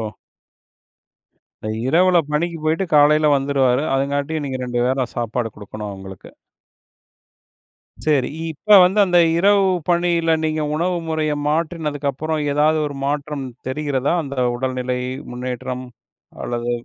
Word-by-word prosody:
ஓ! 110 Hz, -, -3 dB, 1.6 s
அ -, -, -2 dB, 0.2 s
இரவுல 175 Hz, +4 st, +4 dB
பணிக்கு 165 Hz, +2 st, -1 dB
போயிட்டு 160 Hz, +5 st, +1 dB
காலையில 150 Hz, +1 st, +5 dB
வந்துருவாரு. 135 Hz, 0 st, +1 dB
அதுங்காட்டியும் 140 Hz, +3 st, -1 dB
நீங்க 130 Hz, -1 st, -4 dB
ரெண்டு 120 Hz, -1 st, -2 dB
வேள 130 Hz, -1 st, 0 dB
சாப்பாடு 115 Hz, 0 st, -2 dB
கொடுக்கணும் 105 Hz, 0 st, -7 dB
அவுங்களுக்கு. 95 Hz, -1 st, -10 dB, 1.7 s
சரி. 145 Hz, -4 st, +2 dB, 0.2 s
இப்ப 210 Hz, +7 st, +5 dB
வந்து 190 Hz, +4 st, +1 dB
அந்த 175 Hz, -1 st, +3 dB, 0.2 s
இரவு 200 Hz, +2 st, +4 dB, 0.2 s
பணியில 170 Hz, -2 st, +2 dB
நீங்க 155 Hz, 0 st, -1 dB
உணவு 175 Hz, +3 st, 0 dB
முறைய 155 Hz, -1 st, 0 dB, 0.2 s
மாற்றினதுக்கு 150 Hz, -2 st, -1 dB
அப்புறம் 155 Hz, +2 st, -3 dB
ஏதாவது 155 Hz, +2 st, +3 dB
ஒரு 145 Hz, -, -5 dB
மாற்றம் 145 Hz, 0 st, -2 dB, 0.2 s
தெரிகிறதா? 140 Hz, 0 st, -1 dB
அந்த 140 Hz, -1 st, -7 dB, 0.2 s
உடல்நிலை 130 Hz, 0 st, -2 dB, 0.3 s
முன்னேற்றம் 125 Hz, +1 st, -5 dB, 0.6 s
அல்லது 120 Hz, 0 st, -3 dB
145 Hz, 120 wpm, -20 LUFS, 130-160 Hz, 1.7 s, காலையில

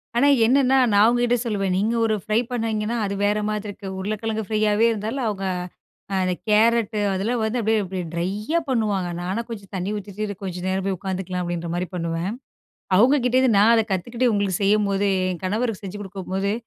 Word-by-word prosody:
ஆனா, 245 Hz, +4 st, +4 dB, 0.2 s
என்னான்னா, 265 Hz, +2 st, +4 dB
நான் 205 Hz, 0 st, +5 dB
அவுங்ககிட்ட 240 Hz, +1 st, +3 dB
சொல்லுவேன். 195 Hz, -4 st, 0 dB
நீங்க 215 Hz, +4 st, +1 dB
ஒரு 220 Hz, -, +1 dB
ஃப்ரை 215 Hz, +1 st, +1 dB
பண்ணிங்கன்னா, 225 Hz, -1 st, -1 dB
அது 200 Hz, -, -2 dB
வேற 210 Hz, +1 st, +2 dB
மாதிரிருக்கு. 205 Hz, -1 st, -5 dB
உருளைக்கிழங்கு 215 Hz, +2 st, -2 dB
ஃப்ரையாவே 215 Hz, +1 st, +2 dB
இருந்தாலும் 225 Hz, +4 st, -3 dB
அவுங்க 195 Hz, -2 st, -3 dB, 0.8 s
அந்த 185 Hz, 0 st, +1 dB
கேரட் 220 Hz, +1 st, +3 dB, 0.2 s
அதெல்லாம் 220 Hz, +5 st, -1 dB
வந்து, 220 Hz, +3 st, 0 dB
அப்படியே 220 Hz, 0 st, +2 dB
அப்படியே 185 Hz, -2 st, -4 dB
ட்ரையா 205 Hz, -, -1 dB
பண்ணுவாங்க. 210 Hz, -7 st, 0 dB
நான்னா, 190 Hz, +6 st, -2 dB
கொஞ்சம் 200 Hz, -4 st, -8 dB
தண்ணீ 185 Hz, +1 st, -2 dB
ஊத்திட்டு 205 Hz, -1 st, -8 dB
சேரி 205 Hz, -1 st, -2 dB
கொஞ்சம் 180 Hz, -1 st, -5 dB
நேரம் 190 Hz, 0 st, -1 dB
போய் 195 Hz, -1 st, -1 dB
உக்காந்துக்கலாம், 185 Hz, -1 st, -3 dB
அப்படின்ற 175 Hz, -1 st, -3 dB
மாரி 180 Hz, 0 st, -2 dB
பண்ணுவேன். 170 Hz, +2 st, -2 dB, 0.7 s
அவுங்க 250 Hz, +8 st, +6 dB
கிட்டேருந்து, 250 Hz, -2 st, +3 dB
நான் 225 Hz, +3 st, +6 dB
அதை 225 Hz, -, +3 dB
கத்துக்கிட்டு, 235 Hz, +7 st, 0 dB
உங்களுக்கு 200 Hz, -3 st, 0 dB
செய்யம்போதே, 200 Hz, -1 st, +2 dB, 0.2 s
என் 175 Hz, -, -6 dB
கணவருக்கு 215 Hz, +2 st, -1 dB
செஞ்சு 200 Hz, +1 st, -6 dB
குடுக்கும்போது, 195 Hz, 0 st, -3 dB
205 Hz, 170 wpm, -23 LUFS, 190-225 Hz, 0.8 s, அவுங்க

